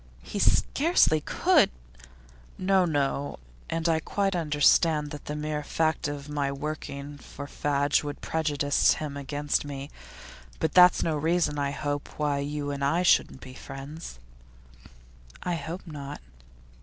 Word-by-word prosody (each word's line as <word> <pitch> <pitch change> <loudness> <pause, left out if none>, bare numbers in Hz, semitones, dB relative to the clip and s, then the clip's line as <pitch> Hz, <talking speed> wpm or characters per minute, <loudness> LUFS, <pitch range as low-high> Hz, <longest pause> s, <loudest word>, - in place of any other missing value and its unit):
'He 205 - -5
scarcely 275 - +3
could - - +3 0.5
' - - -25
'No, 185 0 +3
no. 145 -3 -1 0.3
And 165 0 -1
I 160 -1 +3
quite 195 +4 -1
understand 150 -1 +3
that 150 - -8
the 150 - -4
mere 150 0 -2
fact 160 +1 0
of 145 -1 -5
my 145 -2 -1
working 145 0 -6
for 140 - -9
Fadge 145 0 +1
would 145 -1 -5
prejudice 145 -3 +1
him 150 -2 -5
against 145 +1 -1
me. 140 -1 -7 0.7
But - - -1
that's 180 0 +7
no 160 - 0
reason, 160 0 +1
I 140 -1 0
hope, 145 0 -4
why 145 -2 0
you 145 0 -3
and 140 0 -4
I 165 +6 +2
shouldn't 150 -6 +3
be 130 - -10
friends?' 135 - -9 1.3
'I 180 - -1
hope 165 +4 -5
not. 145 -4 -7
145 Hz, 145 wpm, -27 LUFS, 140-160 Hz, 1.3 s, that's